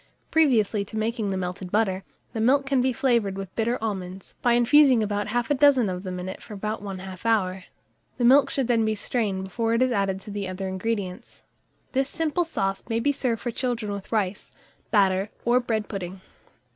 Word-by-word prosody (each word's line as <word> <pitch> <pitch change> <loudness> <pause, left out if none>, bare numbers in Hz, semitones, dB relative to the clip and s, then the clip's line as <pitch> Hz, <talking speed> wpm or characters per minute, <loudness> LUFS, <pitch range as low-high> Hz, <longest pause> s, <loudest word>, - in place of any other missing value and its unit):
Previously 230 -10 +3
to 220 - -7
making 220 0 -1
the 195 -1 -1
melted 180 0 -4
butter, 195 -3 +1 0.3
the 225 - -2
milk 275 +4 +3
can 270 -2 +2
be 260 +1 +2
flavoured 235 -6 +1
with 195 -1 -7
bitter 235 +2 0
almonds, 190 -3 -5
by 240 - +3
infusing 250 0 +5
about 205 0 -1
half 240 +4 -1
a - - +6
dozen 270 -6 +4
of 180 -1 -4
them 185 -1 -5
in 180 - -5
it 190 - -6
for 210 - -9
about 210 +2 -3
1/2 190 -2 -7
hour; 190 -5 +1 0.5
the 245 - +1
milk 275 +2 +6
should 270 -3 -1
then 230 -2 +3
be 220 0 +1
strained 205 -3 -1
before 225 +4 -1
it 230 - +1
is 255 - +1
added 195 -3 0
to 205 - -9
the 200 -1 -3
other 185 +1 -4
ingredients. 190 -1 -4 0.5
This 270 +1 0
simple 325 +2 0
sauce 195 -11 -2
may 225 0 +1
be 285 +5 +2
served 240 -5 -1
for 240 - -2
children 235 -4 -2
with 200 -1 -6
rice, 205 -3 -1 0.4
batter, 195 -1 +3 0.2
or 240 +1 +4
bread 225 -4 -2
pudding. 190 -2 -6
215 Hz, 200 wpm, -25 LUFS, 195-245 Hz, 0.5 s, a